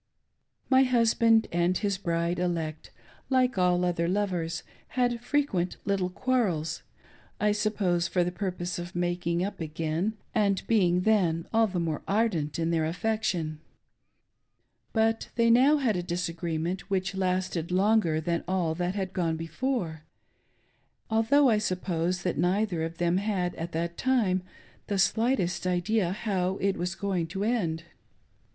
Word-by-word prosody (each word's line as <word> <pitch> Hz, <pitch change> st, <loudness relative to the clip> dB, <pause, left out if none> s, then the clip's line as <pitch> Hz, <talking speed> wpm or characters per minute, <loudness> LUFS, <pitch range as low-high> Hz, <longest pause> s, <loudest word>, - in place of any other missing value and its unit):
My 260 Hz, 0 st, +5 dB
husband 230 Hz, -3 st, +4 dB
and 175 Hz, +1 st, +2 dB
his 200 Hz, -3 st, -1 dB
bride 170 Hz, -1 st, -1 dB
elect, 165 Hz, -3 st, -2 dB, 0.4 s
like 255 Hz, -5 st, +2 dB
all 180 Hz, 0 st, +3 dB
other 170 Hz, -1 st, 0 dB
lovers, 180 Hz, -4 st, -1 dB, 0.3 s
had 240 Hz, -1 st, +1 dB
frequent 245 Hz, -11 st, 0 dB
little 195 Hz, -2 st, 0 dB
quarrels 185 Hz, -8 st, 0 dB, 0.3 s
— -, -, -29 dB
I 210 Hz, 0 st, +3 dB
suppose 200 Hz, -5 st, 0 dB
for 180 Hz, -1 st, +1 dB
the 175 Hz, -, -2 dB
purpose 180 Hz, -2 st, -3 dB
of 175 Hz, +1 st, -7 dB
making 175 Hz, 0 st, 0 dB
up 205 Hz, -, -6 dB
again, 165 Hz, +6 st, -2 dB, 0.2 s
and 200 Hz, -4 st, +1 dB
being 180 Hz, -6 st, +3 dB
then 180 Hz, -6 st, +2 dB
all 225 Hz, 0 st, +4 dB
the 185 Hz, -3 st, -3 dB
more 160 Hz, -3 st, -2 dB
ardent 195 Hz, -9 st, 0 dB
in 165 Hz, 0 st, 0 dB
their 165 Hz, -1 st, +1 dB
affection. 175 Hz, -4 st, -1 dB, 1.3 s
But 225 Hz, 0 st, +1 dB
they 230 Hz, -1 st, +4 dB
now 265 Hz, +6 st, +6 dB
had 260 Hz, -6 st, +1 dB
z. 180 Hz, -, -1 dB
disagreement 175 Hz, +1 st, -3 dB
which 190 Hz, -1 st, -1 dB
lasted 185 Hz, -3 st, -1 dB
longer 185 Hz, -3 st, +2 dB
than 170 Hz, +1 st, -1 dB
all 180 Hz, -3 st, 0 dB
that 175 Hz, +3 st, -2 dB
had 190 Hz, -2 st, -3 dB
gone 165 Hz, -3 st, 0 dB
before; 165 Hz, -, -3 dB, 1.1 s
although 225 Hz, +6 st, +4 dB
I 220 Hz, -4 st, +4 dB
suppose 180 Hz, -2 st, -1 dB
that 180 Hz, -, -1 dB
neither 185 Hz, -1 st, +1 dB
of 165 Hz, +1 st, -4 dB
them 175 Hz, +1 st, +1 dB
had, 190 Hz, -3 st, -1 dB
at 170 Hz, +1 st, -5 dB
that 170 Hz, +1 st, -3 dB
time, 220 Hz, -8 st, +2 dB, 0.5 s
the 200 Hz, -, -1 dB
slightest 195 Hz, -3 st, +1 dB
idea 180 Hz, +1 st, +1 dB
how 190 Hz, -2 st, -1 dB
it 195 Hz, 0 st, 0 dB
was 180 Hz, +2 st, -3 dB
going 190 Hz, -4 st, -1 dB
to 195 Hz, +4 st, -4 dB
end. 180 Hz, -8 st, 0 dB
185 Hz, 145 wpm, -28 LUFS, 170-215 Hz, 1.3 s, now